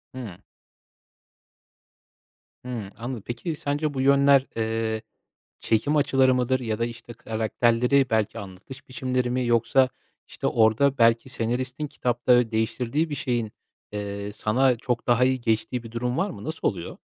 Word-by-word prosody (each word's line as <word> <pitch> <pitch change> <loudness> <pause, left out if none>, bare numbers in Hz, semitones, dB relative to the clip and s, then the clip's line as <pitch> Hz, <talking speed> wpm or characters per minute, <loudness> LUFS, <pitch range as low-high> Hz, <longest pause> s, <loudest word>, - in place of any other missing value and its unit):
Hıı. 110 -9 -7 2.3
Hı. 115 -6 -5
Anladım. 120 -2 -5
Peki, 120 +7 -4
sence 145 +1 -2
bu 130 - -2
yönler, 140 0 +5
eee, 110 -1 -1 0.6
çekim 130 +7 +1
açıları 135 -3 +3
mıdır 130 +1 +1
ya 110 -3 -3
da, 115 - +1
işte, 120 0 -8
karakterleri, 120 +4 +1
belki, 110 -2 0
anlatış 100 +8 -11
biçimleri 125 0 -1
mi 125 0 0
yoksa, 120 +3 +3 0.4
işte, - - -3
orada 115 +5 +3
belki 115 +2 +3
senaristin 130 +5 -2
kitapta 125 -3 +2
değiştirdiği 125 +7 0
bir 145 - -3
şeyin, 120 -5 -2 0.4
eee, 100 0 -4
sana 120 +4 +2
çok 125 -1 -3
daha 120 +1 +4
iyi 130 -1 +1
geçtiği 115 +2 -1
bir 115 - -10
durum 125 +2 -2
var 200 - +1
mı? - - -9
Nasıl 160 +1 -2
oluyor? 90 -4 -4
120 Hz, 140 wpm, -25 LUFS, 115-130 Hz, 2.3 s, yönler